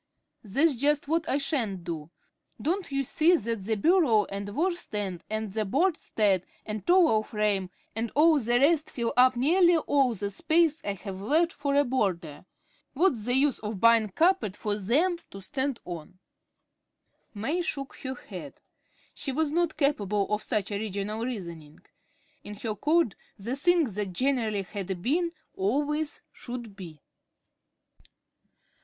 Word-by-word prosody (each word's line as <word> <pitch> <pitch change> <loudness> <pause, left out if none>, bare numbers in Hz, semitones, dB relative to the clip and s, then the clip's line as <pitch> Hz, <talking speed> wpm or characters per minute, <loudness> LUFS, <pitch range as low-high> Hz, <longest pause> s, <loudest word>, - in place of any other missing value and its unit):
"That's 280 +10 +2
just 285 +3 +1
what 325 +1 0
I 270 - +2
sha'n't 235 - -1
do. 160 -3 -5 0.5
Don't 360 +1 -2
you 275 0 0
see 320 +6 +3
that 230 - -3
the 220 +1 0
bureau 255 - +3
and 200 +1 -4
washstand 210 - -2
and 215 -2 -3
the 220 0 0
bedstead 215 - +1 0.2
and 210 -2 -5
towel 345 -12 +5
frame 210 -4 -1 0.3
and 225 0 -2
all 310 +1 +5
the 240 0 +2
rest 305 +3 +3
fill 235 -2 -2
up 255 +1 +5
nearly 345 +7 +4
all 275 -6 +2
the 200 0 -3
space 320 - +2
I 200 - -2
have 195 0 -8
left 320 - +2
for 280 -1 -1
a 285 - +5
border. 185 - -2 0.5
What's 275 - +1
the 245 +1 +2
use 275 0 +2
of 210 -2 -5
buying 230 -1 +5
carpet 325 - +1
for 210 - -2
them 295 - +1
to 195 - -9
stand 265 +5 -2
on?" 175 0 -8 1.2
May 280 - -1
shook 275 -5 -4
her 260 0 -5
head. - - -10 0.5
She 275 - -4
was 300 +2 0
not 340 0 0
capable 210 - 0
of 210 - 0
such 210 -2 -2
original 205 +1 -3
reasoning. 170 -11 -6 0.6
In 210 - -8
her 215 +1 -4
code 300 - +2 0.2
the 230 +6 -3
thing 345 +4 +3
that 205 -6 -3
generally 225 -3 0
had 190 -2 -5
been 335 +6 +1 0.2
always 290 +9 -1
should 240 -4 -8
be. 170 -6 -10
235 Hz, 150 wpm, -27 LUFS, 205-300 Hz, 1.2 s, towel